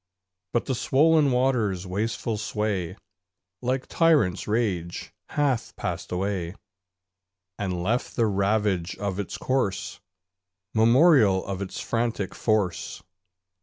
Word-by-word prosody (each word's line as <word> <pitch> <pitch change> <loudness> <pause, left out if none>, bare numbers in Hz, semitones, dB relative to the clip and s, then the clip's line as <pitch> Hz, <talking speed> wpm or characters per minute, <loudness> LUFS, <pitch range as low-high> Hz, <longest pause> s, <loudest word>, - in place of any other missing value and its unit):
But 120 - 0
the 130 - -1
swoln 150 +3 +3
water's 120 -8 +1
wasteful 105 +4 -2
sway, 105 -5 -2 0.7
Like 130 +1 -1
tyrant's 145 - +2
rage, 100 -6 -2 0.2
hath 140 -6 0
passed - - -4
away, 90 -1 -2 1.0
And 90 -4 -2
left 115 +6 -1
the 115 - +2
ravage 100 -3 0
of 100 -1 -3
its 100 - -4
course 115 -7 -1 0.7
Memorial 115 - +5
of 100 -1 -4
its 95 - -5
frantic 115 -4 -2
force. 105 -7 -1
105 Hz, 105 wpm, -25 LUFS, 95-125 Hz, 1.0 s, Memorial